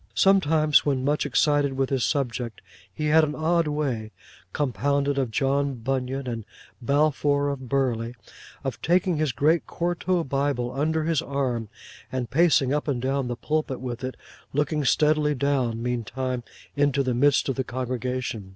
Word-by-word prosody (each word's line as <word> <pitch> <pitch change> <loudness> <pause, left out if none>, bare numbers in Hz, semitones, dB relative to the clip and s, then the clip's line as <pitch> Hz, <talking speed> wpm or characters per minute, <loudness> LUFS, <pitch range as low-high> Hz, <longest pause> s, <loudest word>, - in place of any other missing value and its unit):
Sometimes, 160 -6 +4
when 135 -3 0
much 145 0 +1
excited 145 0 +2
with 135 0 -1
his 130 -3 +1
subject, 120 -5 -2 0.3
he 150 - -4
had 155 +1 +5
an 150 -1 -1
odd 165 +1 +1
way—compounded 140 +2 -2
of 130 -3 0
John 135 +4 0
Bunyan, 130 +2 -2
and 115 -3 -4 0.4
Balfour 145 +1 +2
of 130 -3 -5
Burley—of 125 0 -3
taking 180 0 +2
his 155 -2 +1
great 150 +8 +2
quarto 175 +1 -1
Bible 135 -3 -1
under 155 +4 0
his 160 -2 +1
arm 130 -6 -2 0.4
and 125 -4 -3
pacing 145 -3 +3
up 150 +1 -1
and 135 -4 0
down 135 +1 -1
the 120 - -2
pulpit 150 +1 -2
with 125 0 -5
it; 130 0 -4 0.4
looking 150 +1 0
steadily 150 +2 +3
down, 130 -4 0
meantime, 125 +1 -2 0.3
into 140 -1 +2
the 130 -1 0
midst 140 +3 +3
of 135 - +1
the 130 - -1
congregation. 125 -4 -3
140 Hz, 150 wpm, -25 LUFS, 125-150 Hz, 0.4 s, had